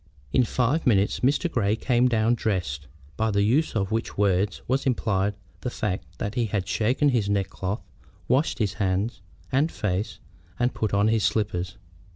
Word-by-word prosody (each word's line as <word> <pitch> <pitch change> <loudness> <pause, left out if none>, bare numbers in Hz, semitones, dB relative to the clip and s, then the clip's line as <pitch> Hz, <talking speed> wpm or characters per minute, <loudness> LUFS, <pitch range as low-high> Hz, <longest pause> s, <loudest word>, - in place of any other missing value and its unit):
In 125 - +4
five 130 +7 +1
minutes 100 -3 +3
Mr. 140 +7 +2
Grey 110 -9 +1
came 125 +1 +2
down 115 -1 +2
"dressed," 90 - -2 0.3
by 110 0 +1
the 100 -1 +2
use 130 +9 +2
of 100 -1 0
which 115 +1 -2
word 100 0 +2
was 135 +2 0
implied 105 -5 +1 0.2
the 125 - -3
fact 90 -7 -4
that 100 - -3
he 120 -2 0
had 100 -3 -2
shaken 125 +6 +2
his 115 -6 +1
neckcloth, 100 +1 -2 0.4
washed 135 +5 +2
his 105 -6 0
hands 95 +3 0 0.3
and 145 +5 +2
face, 100 0 -2 0.4
and 120 +1 +1
put 110 - -1
on 100 +1 +3
his 110 -2 +2
slippers. 100 -2 -1
110 Hz, 170 wpm, -25 LUFS, 100-120 Hz, 0.4 s, In